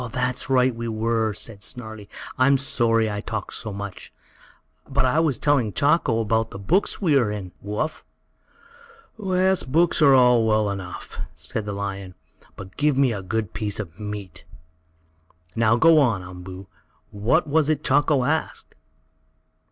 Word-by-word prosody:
"That's 130 0 -1
right 130 -1 +3
we 115 0 -5
were," 110 0 0
said 105 -4 -8
Snarlie. 110 -2 -7 0.3
"I'm 135 +2 +4
sorry 115 -4 +1
I 105 0 -3
talked 110 -2 -5
so 110 - -6
much. 100 -1 -7 0.8
But 135 -1 +1
I 130 +5 +2
was 155 -6 +1
telling 130 -8 +1
Chako 140 - +2
about 110 +1 0
the - - -8
books 170 - 0
we 165 -7 +3
are 115 -5 +1
in, 100 -4 -5
Woo 105 +1 -5
Uff." 155 +5 -2 1.2
"Yes, 185 0 +2
books 165 +5 +1
are 140 -3 +7
all 125 -2 +5
well 110 -1 +2
enough," 95 -2 -7 0.2
said 110 - -5
the 105 - -4
lion, 100 -2 -5 0.4
"but 95 0 -11
give 150 -2 +2
me 135 -4 +3
a 100 - -4
good 105 +1 -3
piece 105 -1 -2
of 95 -2 -7
meat. 105 -5 -7 1.1
Now 115 0 +3
go 160 +5 +6
on, 115 -10 +2
Umboo. 90 +1 -9 0.5
What 110 +12 +1
was 155 0 +2
it 155 -1 0
Chako 145 -1 +3
asked?" 155 +5 -2
115 Hz, 155 wpm, -23 LUFS, 105-140 Hz, 1.2 s, are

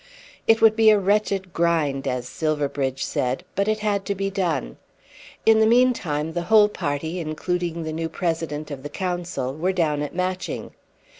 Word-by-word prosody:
It 225 0 +5
would 220 -1 +7
be 220 -1 +6
a 215 - +6
"wretched 195 -2 0
grind," 155 -5 +1
as 125 -1 -2
Silverbridge 145 -4 -1
said, 125 +1 -1
but 200 +1 0
it 215 0 0
had 200 -2 +1
to 200 - -1
be 195 +1 -2
done. 175 -9 -2 0.7
In 220 0 +6
the 220 - +5
meantime 200 -11 +2
the 175 - -1
whole 215 -1 +6
party, 160 -1 -3
including 170 +1 -2
the 155 0 -4
new 165 0 -3
President 160 -4 -3
of 140 -2 -6
the 145 - -7
Council, 175 -6 -3
were 175 +5 0
down 155 -5 0
at 145 +3 -5
Matching. 185 0 -3
170 Hz, 170 wpm, -23 LUFS, 150-200 Hz, 0.7 s, would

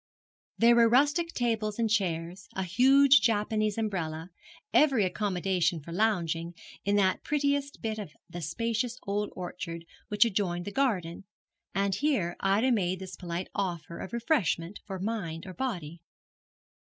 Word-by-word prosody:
There 235 +1 +6
were 230 -1 +6
rustic 290 +7 +3
tables 220 -6 -1
and 230 -1 +1
chairs, 180 -3 -1
a 190 - -1
huge 270 +9 +6
Japanese 215 -1 +1
umbrella, 180 -6 -3 0.4
every 270 -9 +4
accommodation 185 -3 0
for 155 +3 -10
lounging, 170 -4 0 0.3
in 200 +1 +1
that 190 -2 +2
prettiest 285 -1 -1
bit 220 -1 -2
of 200 -7 -6 0.2
the 175 - -7
spacious 230 - -2
old 205 +1 -1
orchard 170 -2 -6 0.2
which 210 +2 +4
adjoined 185 -5 -1
the 205 - -4
garden, 195 -9 -1 0.5
and 195 0 +1
here 200 - 0
Ida 205 +7 +2
made 185 -5 +1
this 190 -1 -8
polite 175 0 -5
offer 175 -4 -3
of - - -6
refreshment 210 - 0
for 195 -2 -4
mind 185 -5 -3
or 185 - -8
body. 175 - -4
200 Hz, 140 wpm, -29 LUFS, 175-230 Hz, 0.5 s, There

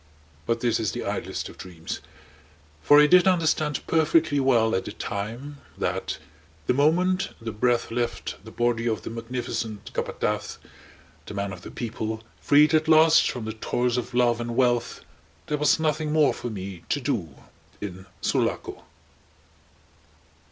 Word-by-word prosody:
But 115 0 0
this 120 -2 +1
is 110 -3 -1
the - - -4
idlest - - -3
of - - -13
dreams; 85 -2 -6 0.8
for 145 - +7
I 150 - +8
did 180 +5 +6
understand 155 -5 +1
perfectly 160 -2 +3
well 120 -4 +3
at 95 - 0
the - - -5
time 115 +8 -5 0.2
that - - -2 0.5
the - - +2
moment 180 +7 +2
the 115 -1 -5
breath 120 +2 +1
left 120 0 -3
the - - -10
body 120 -1 0
of 110 - -2
the - - -5
Magnificent 115 -2 -5
Capataz, - - -2 0.7
the - - -7
Man 100 -1 -2
of - - -10
the - - -9
People, 110 -1 -4 0.2
freed 150 +2 +5
at 155 0 +3
last 160 0 +6
from 120 -4 -4
the 110 - -4
toils 120 +2 -1
of 125 0 -3
love 120 -1 +3
and 120 0 -4
wealth, 120 -2 +1 0.4
there 150 -1 -2
was 150 +2 +3
nothing 155 -1 0
more 155 -1 +4
for 120 - -5
me 95 -4 -6
to 145 - +1
do 105 - -2 0.4
in 95 -2 -7
Sulaco. - - -1
120 Hz, 155 wpm, -25 LUFS, 110-150 Hz, 0.8 s, I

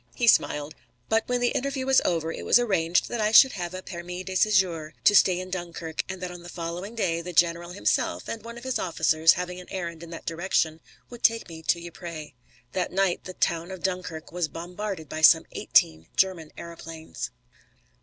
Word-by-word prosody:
He 240 - 0
smiled. 150 -8 +3 0.4
But 225 0 +2
when 245 0 +1
the 245 - +3
interview 270 0 -2
was 265 0 +5
over 165 -2 0
it - - -6
was - - +5
arranged 180 -8 +1
that 235 - -2
I 210 0 +2
should 265 +3 +8
have 175 -1 -5
a 185 - -6
permis 180 +1 -6
de 190 - -5
séjour 185 -6 +2
to 205 - +6
stay 185 -2 +5
in 185 0 -7
Dunkirk, 170 -3 -4
and 190 0 -5
that 180 - -3
on 175 -1 -9
the 175 - -10
following 175 +5 -5
day 170 -7 0
the 180 +1 -7
general 170 0 +2
himself 100 - 0
and 225 -2 -5
one 235 +1 -8
of 235 - -10
his 260 -1 -1
officers 160 -1 +3
having 180 0 -4
an 180 - -12
errand 170 -3 -5
in 170 - -9
that 165 - -9
direction 165 -2 0 0.3
would 240 -1 -10
take 230 -1 +3
me 165 -2 -9
to 170 - +3
Ypres. 170 -3 -8 0.4
That 185 -1 -2
night 190 -1 0
the 185 - -8
town 170 +1 0
of 190 -2 -8
Dunkirk 180 -4 -3
was 175 -2 -1
bombarded 175 +2 -6
by 155 - -5
some 155 - +7
eighteen 80 0 +2
German 180 -5 +1
aëroplanes. 165 -1 -7
175 Hz, 205 wpm, -26 LUFS, 165-190 Hz, 0.4 s, should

